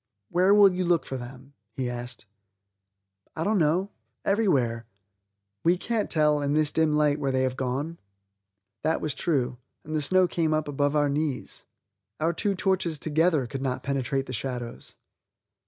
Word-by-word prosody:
"Where 180 +3 +3
will 200 -2 +7
you 185 0 -1
look 175 -2 +2
for 135 - -5
them?" 130 +2 -9 0.2
he 130 +1 -2
asked. 120 -1 -6 1.1
"I 160 - -2
don't 210 +1 +2
know; 175 +6 +1 0.3
everywhere." 130 - +1 0.8
"We 175 +2 +4
can't 225 +2 -1
tell, 150 -2 +3
in 145 0 0
this 155 -1 +2
dim 160 -1 +2
light, 150 -1 +2
where 140 -2 0
they 130 0 +1
have 130 -1 -1
gone." 135 +6 -3 0.8
That 160 - +1
was 155 - -2
true, 130 -7 -1 0.2
and 155 +1 -5
the 155 - +1
snow 185 +5 +3
came 160 -3 0
up 155 -1 -1
above 145 0 0
our 145 -1 +3
knees. 145 -2 -3 0.5
Our 165 +2 +1
two 200 +4 0
torches 185 -4 0
together 155 -1 +2
could 135 +2 -6
not 130 -2 -2
penetrate 135 0 -1
the 130 - -7
shadows. 120 0 -5
150 Hz, 165 wpm, -26 LUFS, 135-170 Hz, 1.1 s, will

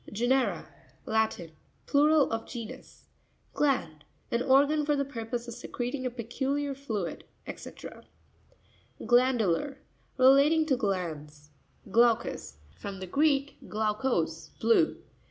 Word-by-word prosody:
Ge'nera.—Latin. 220 -5 -1 0.3
Plural 295 0 +4
of 225 0 -3
genus. 240 +1 -9 0.5
Gianp.—An 235 - -2
organ 285 +3 +4
for 295 0 +1
the 280 0 0
purpose 240 -2 -5
of 235 - -6
secreting 250 +2 -4
a - - -1
peculiar 265 +4 -2
fluid, 225 -10 -4 0.3
&c. - - -9 1.3
Gua'npuLar.—Relating 265 - +2
to 285 -4 +2
glands. 155 -8 -4 0.4
Grav'cus.—From 195 - 0
the 185 - -5
Greek, 280 - +1
glaukos, 210 -8 -1
blue. 230 +1 +3
240 Hz, 90 wpm, -29 LUFS, 205-275 Hz, 1.3 s, Plural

